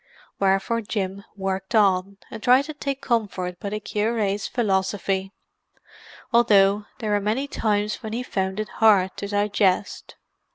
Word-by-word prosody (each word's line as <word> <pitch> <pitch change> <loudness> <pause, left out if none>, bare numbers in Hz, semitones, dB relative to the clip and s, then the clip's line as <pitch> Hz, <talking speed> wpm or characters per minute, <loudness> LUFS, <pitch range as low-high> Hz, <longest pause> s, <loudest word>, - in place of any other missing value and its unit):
Wherefore 195 +4 +1
Jim 200 -2 -3
worked 190 +2 -3
on, 195 -2 +2
and 225 - -7
tried 255 +4 +5
to 310 - -6
take 275 -2 -4
comfort 195 -7 -1
by 200 - -4
the 210 +1 -3
cure's 210 -1 -1
philosophy; 195 -3 -1 1.0
although 205 -3 +4
there 215 -3 -3
were 205 0 +2
many 225 +8 -1
times 210 -5 -1
when 220 -3 -6
he 245 +2 -2
found 190 -3 -2
it 215 - -3
hard 200 -4 +4
to 200 - -4
digest. 205 -1 0
205 Hz, 140 wpm, -24 LUFS, 195-220 Hz, 1.0 s, tried